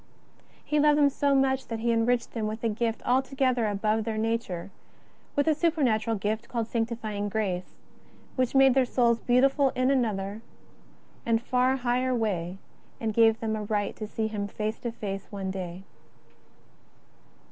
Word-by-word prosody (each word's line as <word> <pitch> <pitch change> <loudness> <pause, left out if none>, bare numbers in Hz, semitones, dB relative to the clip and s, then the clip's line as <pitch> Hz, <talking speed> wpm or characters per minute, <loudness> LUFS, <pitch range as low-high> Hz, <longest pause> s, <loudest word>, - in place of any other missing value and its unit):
He 300 - +1
loved 295 0 +5
them 285 -1 +4
so 280 0 +1
much 265 0 +1
that 230 - -3
He 235 +1 +1
enriched 235 +1 +1
them 220 -2 -2
with 220 +2 -5
a 230 - +2
gift 225 +1 -2
altogether 260 -2 +1
above 215 +2 0
their 220 0 -3
nature, 215 -5 -2 0.6
with 285 +1 +1
a 315 - +5
supernatural 260 -9 +1
gift 215 +3 -3
called 235 -2 -1
sanctifying 225 -3 -2
grace, 190 -4 -2 0.6
which 255 0 0
made 270 -1 +6
their 265 0 +4
souls 235 -2 +2
beautiful 270 +3 +3
in 255 +1 +2
another 215 -5 -1 0.8
and 230 -1 +2
far 255 +2 +1
higher 250 0 0
way, 190 -6 -2 0.4
and 220 -1 -2
gave 225 0 +4
them 220 -1 -1
a 215 - -3
right 205 -1 -1
to 215 - -5
see 220 +1 -2
Him 210 -2 -3
face 215 +2 -3
to 235 - -3
face 195 -4 -5
one 195 -2 -4
day. 185 -1 -6
230 Hz, 160 wpm, -27 LUFS, 215-255 Hz, 0.8 s, made